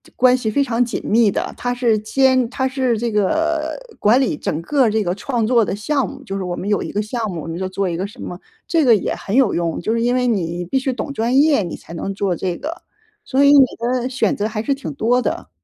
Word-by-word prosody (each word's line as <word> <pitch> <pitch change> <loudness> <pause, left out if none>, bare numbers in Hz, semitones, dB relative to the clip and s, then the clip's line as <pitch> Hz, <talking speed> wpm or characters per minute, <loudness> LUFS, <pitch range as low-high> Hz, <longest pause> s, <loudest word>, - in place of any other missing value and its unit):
关 255 0 +4
系 235 -3 -2
非 280 +6 +2
常 245 -2 +1
紧 240 - -4
密 220 -1 +3
的。 - - -2
它 245 0 -2
是 240 -3 +2
兼 255 +3 +2
它 260 +1 0
是 260 -2 0
这 235 0 -1
个 315 - 0 0.2
管 230 +6 +4
理 250 - 0
整 155 - -3
个 265 +8 +2
这 220 0 +1
个 175 -2 -1
创 235 +2 -1
作 235 -2 +4
的 195 - -2
项 270 +7 -1
目， 280 0 -10
就 195 -7 -5
是 195 - -3
我 180 -1 -3
们 195 - -4
有 205 - +1
一 - - -6
个 210 - -1
项 220 +1 -3
目， 170 -3 -5
我 - - -8
们 165 0 -4
就 190 +1 -2
做 190 0 -2
一 170 - -3
个 185 - -2
什 215 +5 -11
么， 175 - -6 0.3
这 330 -3 +2
个 235 -3 +7
也 200 - -2
很 200 - -4
有 260 -6 +3
用， 170 -1 -1
就 215 - -1
是 230 0 0
因 245 +1 +2
为 250 0 +1
你 175 -6 -1
必 185 - -1
须 265 0 -1
懂 270 - -5
专 240 -1 -1
业， 290 -8 +3
你 170 - -5
才 - - -12
能 195 +4 -4
做 195 -2 -1
这 180 +1 -2
个， 330 +3 -6 0.4
所 275 -6 +2
以 280 - +7
你 280 -2 +8
的 245 +1 -1
选 260 0 0
择 205 - 0
还 215 -1 -3
是 275 +5 0
挺 165 - -6
多 235 - +2
的。 250 - -3
230 Hz, 290 characters per minute, -19 LUFS, 195-260 Hz, 0.4 s, 你